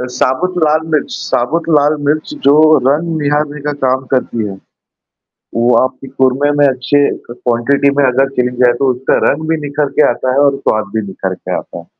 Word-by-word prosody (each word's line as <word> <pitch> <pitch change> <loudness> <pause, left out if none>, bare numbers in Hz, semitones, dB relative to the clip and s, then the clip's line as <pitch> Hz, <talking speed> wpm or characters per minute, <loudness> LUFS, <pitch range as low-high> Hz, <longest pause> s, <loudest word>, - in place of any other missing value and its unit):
अ, 125 - -3
साबुत 180 +9 -1
लाल 155 +1 +2
मिर्च 150 - 0
साबुत 155 +8 -1
लाल 150 +1 +2
मिर्च 155 - -1
जो 140 - +7 0.4
रंग 160 +3 0
निहारने 145 0 -1
का 150 +1 -3
काम 130 +1 +1
करती 120 -3 -1
है। 95 - -7 1.0
वो 120 +1 +2
आपकी 130 +1 -5
कोरमें 135 +2 +1
में 145 - +5
अच्छे 135 +2 +1 0.3
क - - -6
क्वांटिटी 125 +4 +1
में - - +4
अगर 135 +2 +2
चेन 125 0 0
जाए 120 -1 +5
तो 130 - +3
उसका 125 +2 0
रंग 155 +2 -1
भी 160 - +1
निखर 145 0 -1
के - - +5
आता 130 +1 -1
है 135 - +2
और 135 - -4
स्वाद 110 -2 -1
भी 110 - +1
निखर 95 0 -4
के - - -5
आता - - -8
है। - - -13
135 Hz, 200 wpm, -14 LUFS, 125-150 Hz, 1.0 s, जो